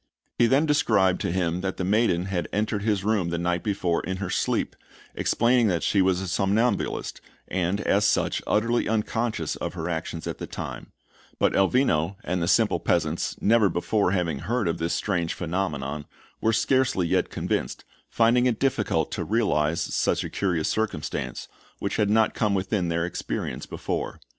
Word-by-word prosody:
He 120 - +6
then 135 +5 +3
described 105 - +2
to - - -1
him 90 -1 0
that 95 0 -3
the - - -2
maiden 95 -2 +2
had 90 -4 -2
entered 105 0 -1
his 105 -2 0
room 100 -5 +1
the 85 - -2
night 85 +1 0
before 95 -5 0
in 95 0 -4
her 95 -1 -4
sleep, - - 0 0.4
explaining 120 0 +2
that 90 -4 0
she 100 - +3
was 95 -1 +2
a 95 - -4
somnambulist, 100 +7 0 0.3
and, 95 +2 -1
as 100 0 +2
such, 105 - +1
utterly 115 +2 +1
unconscious 110 +1 -1
of - - -4
her 80 - -4
actions 85 0 -4
at - - -5
the - - -5
time; - - -7 0.5
but - - +2
Elvino 95 - +2
and 90 0 -1
the 85 - 0
simple - - +3
peasants, - - 0
never 110 -2 +4
before 90 +3 +1
having 85 -6 -1
heard 110 - -1
of 85 - -1
this 85 +1 -1
strange 85 -5 -1
phenomenon, 75 -5 -3 0.4
were 110 - +3
scarcely 120 -4 +2
yet - - +1
convinced, - - -3 0.2
finding 120 +2 +3
it 115 -3 0
difficult 135 -1 0
to - - -2
realize 85 -8 +1
such - - 0
a - - -6
curious 90 -5 0
circumstance, 110 -9 -3 0.3
which 100 - -3
had 105 -2 +2
not 110 +1 +3
come 105 -2 +1
within 95 -1 0
their 85 0 0
experience 90 - -4
before. - - -4
95 Hz, 170 wpm, -25 LUFS, 85-110 Hz, 0.5 s, He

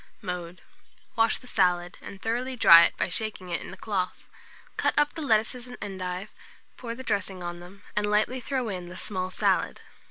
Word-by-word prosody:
Mode. 180 -3 -6 0.5
Wash 225 -1 +3
the - - -13
salad, 180 -5 +1
and 195 - -9
thoroughly 245 +5 -2
dry 170 -8 +9
it - - -2
by - - +1
shaking 200 -1 -2
it 170 - -1
in - - -8
a - - -10
cloth. 190 -4 -2 0.5
Cut - - +1
up 295 0 +4
the 320 - -5
lettuces 240 -1 +1
and 250 - -9
endive, 190 -1 -5 0.5
pour 230 -2 -6
the 260 - -8
dressing 195 -5 -2
on 175 0 -5
them, 185 +3 -13
and 210 0 +1
lightly 215 +5 +2
throw 260 -1 -2
in 180 -4 -5
the 180 - -9
small 185 -2 -3
salad. - - +1
200 Hz, 190 wpm, -27 LUFS, 180-230 Hz, 0.5 s, dry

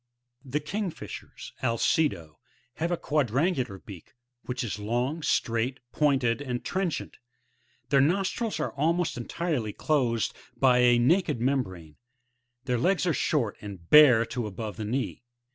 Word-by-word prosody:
The 140 +2 -2
Kingfishers,— 190 +4 -6
v^/ce£/o,~(r/a/« 115 0 0
3, 155 +6 +3
fig. 100 - -7
10.)— 80 -2 -15 0.4
have 170 +2 -1
a 175 - +1
quadrangular 140 - 0
beak, 95 +5 -13 0.3
which 125 0 -2
is 105 -2 -4
long, 120 +9 -1
straight, 120 -1 0
pointed 135 -4 +1
and 125 -3 -4
trenchant; 185 -3 -2 0.7
their 140 -1 +5
nostrils 195 - 0
are 150 - -2
almost 165 +4 0
entirely 125 -3 -2
closed 125 -7 0 0.2
by 125 -2 +4
a 120 -1 +5
naked 150 +3 +2
membrane; 95 - -2 0.7
their 125 -3 0
legs 185 +7 +2
are 175 - +2
short, 130 -8 0
and 95 -5 -10
bare 130 -7 +8
to 120 -1 -4
above 105 -1 -6
the 110 - -4
knee. 125 +5 -2
130 Hz, 145 wpm, -27 LUFS, 115-155 Hz, 0.7 s, bare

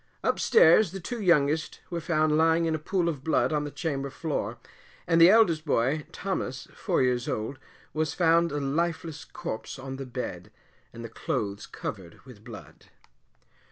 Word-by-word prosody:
Up - - +1
stairs 455 - +6
the 195 - -5
two 230 +6 -5
youngest 160 -4 +2
were 170 -1 -3
found 155 -2 +1
lying 165 +1 +3
in 165 - 0
a 155 - -1
pool 175 +2 -1
of 145 -5 -3
blood 160 0 +1
on 150 -1 0
the - - -4
chamber 140 -3 -3
floor, 155 +3 -3 0.5
and 165 -1 +3
the 170 - +9
eldest 190 -8 +4
boy, 145 +1 0
Thomas, 135 -11 -4
four - - 0
years 125 -1 0
old, 110 +5 -3 0.3
was 155 0 -1
found 170 -1 +3
a 145 - -2
lifeless 160 +2 -2
corpse 110 - -6
on 135 0 -7
the 135 -1 -6
bed, 120 -8 -6 0.4
and 115 0 -9
the - - -4
clothes 110 -5 -4
covered 90 -5 -7
with 120 -6 -14
blood. 115 -3 -12
155 Hz, 170 wpm, -27 LUFS, 130-165 Hz, 0.5 s, the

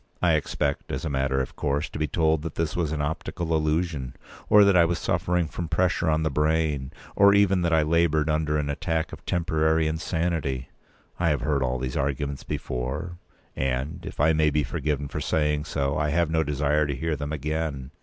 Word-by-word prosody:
I 85 -2 +3
expect, 75 -1 -1
as 65 +5 -3
a 80 - -2
matter 65 0 +1
of 65 - -6
course, 75 +1 -1
to - - -7
be 75 - 0
told 80 0 +1
that 80 0 -6
this 80 -1 -1
was 85 -4 0
an 75 -2 -1
optical 80 +2 -2
illusion, 75 -4 -1 0.3
or 105 0 +8
that 100 -2 +4
I 85 - +7
was 85 +1 +1
suffering 90 -1 0
from 85 +2 -5
pressure 90 0 +1
on 80 0 +1
the 80 - 0
brain, 75 -2 0 0.2
or 100 0 +6
even 95 -2 +4
that 85 -1 +1
I 80 -1 +4
laboured 80 -1 +2
under 75 -1 +1
an 75 -1 -1
attack 80 +2 -2
of - - -10
temporary 80 -1 +1
insanity. 80 -5 -2 0.5
I 85 -1 +2
have 75 -5 +1
heard 70 0 0
all 65 -1 0
these 65 0 -3
arguments 70 0 -2
before, 70 +8 -4 0.4
and, 65 +6 -2
if - - -8
I 80 +2 +4
may 75 -1 +3
be 75 0 +1
forgiven 70 +2 -2
for - - -5
saying 75 -1 0
so, 70 0 -1
I 75 -1 +1
have 85 +1 +1
no 80 0 +2
desire 75 +1 +1
to 70 - -2
hear 80 +4 -1
them 75 +1 -5
again. 75 -3 -3
75 Hz, 205 wpm, -25 LUFS, 70-80 Hz, 0.5 s, or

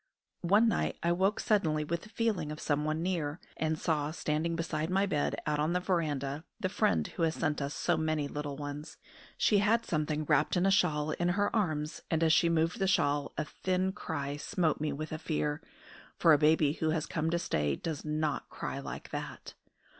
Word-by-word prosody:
One 210 +5 +5
night 225 - 0
I 170 - +3
woke 190 +4 +2
suddenly 160 -8 +2
with 170 +3 -2
the 215 - -13
feeling 215 -10 -1
of 150 - -6
someone 155 +2 0
near, 170 -4 -1 0.2
and 160 0 0
saw, 150 -3 0
standing 160 +1 -1
beside 160 -1 -2
my 195 +2 +2
bed 150 -7 0
out 150 0 0
on 155 +3 +1
the 180 - +2
verandah, 150 -6 -1 0.2
the 185 - -1
friend 80 - +2
who - - -6
has 165 -1 +2
sent 150 -3 -1
us 140 +1 -3
so - - +1
many 155 -2 0
little 145 -1 -5
ones. 145 +1 -6 0.4
She 205 - +4
had 225 +3 +2
something 155 -1 -1
wrapped 150 +4 +2
in 180 - +2
a 195 - +4
shawl 155 -6 +2
in 175 +3 0
her 205 +2 +1
arms, 155 -8 -1
and 160 0 +1
as 160 -1 +5
she 170 - +4
moved 165 +1 +1
the 195 - +2
shawl 145 -6 +2
a - - -1
thin 185 +3 -1
cry 145 -7 -4
smote 160 0 0
me 155 -1 0
with 155 +2 -5
a 155 - -4
fear, 75 - -1 0.6
for 165 - +6
a - - +6
baby 150 -1 +4
who 160 -1 -1
has 160 0 0
come 160 -2 -1
to 170 - +1
stay 75 - 0
does 155 - -4
not 155 -1 -1
cry - - -5
like - - -7
that. - - -6
155 Hz, 205 wpm, -31 LUFS, 150-175 Hz, 0.6 s, for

